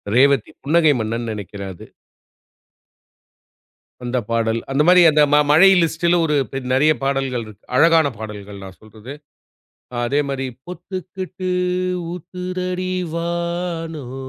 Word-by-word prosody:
ரேவதி 135 -3 +3
புன்னகை 155 0 +4
மன்னன் 115 +2 -3
நெனைக்கிறேன் 100 -2 -7
அது. - - -12 2.2
அந்தப் 120 -3 -2
பாடல் 115 0 0
அந்த 140 +2 +2
மாரி 180 0 +7
அந்த 150 0 +3
ம - - +7 0.2
மழை 185 +6 +7
லிஸ்டுல 170 +2 +1
ஒரு 150 -2 0 0.2
பெ 135 - -4 0.2
நெறையா 150 +3 +4
பாடல்கள் 135 -3 -1
இருக்கு. 110 0 -14
அழகான 165 +1 +5
பாடல்கள். 105 -2 -8
நான் 95 -1 -11
சொல்றது. 110 +5 -11 0.9
அதே 140 +4 +1
மாரி, 135 -1 -2 0.2
"பொத்துக்கிட்டு 185 +1 -6 0.6
ஊத்துதடி 185 +1 -4 0.2
வானம் 170 -4 -4
150 Hz, 115 wpm, -20 LUFS, 115-170 Hz, 2.2 s, மாரி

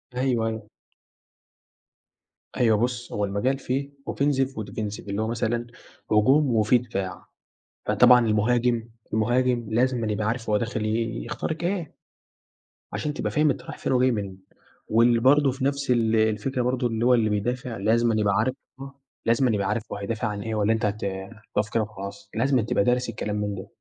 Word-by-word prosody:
أيوه 125 -3 +1
أيوه. 110 -1 -5 1.9
أيوه 110 -3 +4
بُص 120 +1 -2
هو 105 0 0
المجال 105 +8 0
فيه 135 +2 -2 0.2
offensive 135 -2 +1
وdefensive 105 -4 -6
اللي 100 +2 -1
هو 110 - -1
مثلًا 120 0 -1 0.4
هجوم 130 +4 +4
وفيه 110 +3 +4
دفاع، 95 -6 -5 0.6
فطبعًا 125 -2 +6
المهاجم، 115 +2 +1 0.2
المهاجم 120 +2 +1
لازمًا 120 -2 +1
يبقى 105 0 -2
عارف 115 -1 -2
هو 105 - +4
داخل 115 0 -2 0.4
يخترق 160 +1 -4
إيه 175 -4 -2 1.0
عشان 150 -1 -2
تبقى - - -3
فاهم 150 0 +3
أنت - - -1
رايح - - -8
فين - - -2
وجاي 130 0 +4
منين 95 -3 -4 0.4
واللي 115 +1 +4
برضه 135 +2 +4
في 130 +1 -3
نفس 140 -2 0
ال 115 -2 +2
الفكرة 110 +4 +1
برضه 125 0 0
اللي 115 +1 -1
هو 125 - +5
اللي 110 -3 +3
بيدافع 120 +3 -2
لازمًا 115 +2 +2
يبقى 100 -2 +2
عارف 130 +4 +1 0.3
آه 135 0 -10 0.3
لازمًا 120 +1 +3
يبقى 100 -2 0
عارف 110 +1 -1
هو - - -3
هيدافع 105 +2 -3
عن 105 -1 -4
إيه 110 0 -3
والّا 105 +1 +2
أنت 110 - -1
هت 105 +2 -2
هتقف 105 +2 -4
كده 115 -1 +2
وخلاص 100 -2 -8
لازمًا 130 +1 +2
تبقى 105 -2 +1
دارس 125 +1 +1
الكلام 105 -2 -3
من 105 -1 -2
ده، 95 - -8
115 Hz, 170 wpm, -25 LUFS, 105-125 Hz, 1.9 s, فطبعًا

